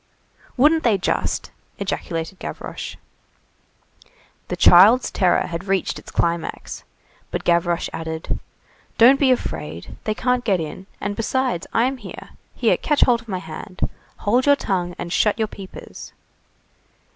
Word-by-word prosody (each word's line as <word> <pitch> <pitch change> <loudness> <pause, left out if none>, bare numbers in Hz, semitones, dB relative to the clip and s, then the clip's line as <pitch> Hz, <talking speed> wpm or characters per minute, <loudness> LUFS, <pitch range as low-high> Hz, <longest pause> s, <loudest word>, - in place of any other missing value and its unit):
"Wouldn't 305 +5 +5
they 230 -7 +3
just!" 180 - -1 0.3
ejaculated 180 -3 -4
Gavroche. - - -6 1.5
The - - -3
child's 210 +9 +7
terror 180 -3 +2
had 170 +2 -5
reached 195 -1 0
its - - -13
climax. 170 -1 -2 0.5
But - - -3
Gavroche 170 0 +2
added:— 160 0 -4 0.6
"Don't 255 +4 +7
be 275 - +4
afraid. 85 - -2
They 215 - 0
can't 250 +1 +1
get 195 -6 +2
in. 165 +4 -6
And 200 +1 -3
besides, 245 -4 -1
I'm 255 +4 +1
here! - - -10 0.3
Here, - - +2
catch 295 -2 0
hold 240 -2 +4
of 230 - -20
my 190 -4 -2
hand. 185 +1 -9 0.5
Hold 245 +6 +3
your 285 - +7
tongue 180 -8 -2
and 170 0 -4
shut 210 0 +2
your 220 -1 0
peepers!" 195 -2 -10
200 Hz, 135 wpm, -22 LUFS, 175-245 Hz, 1.5 s, child's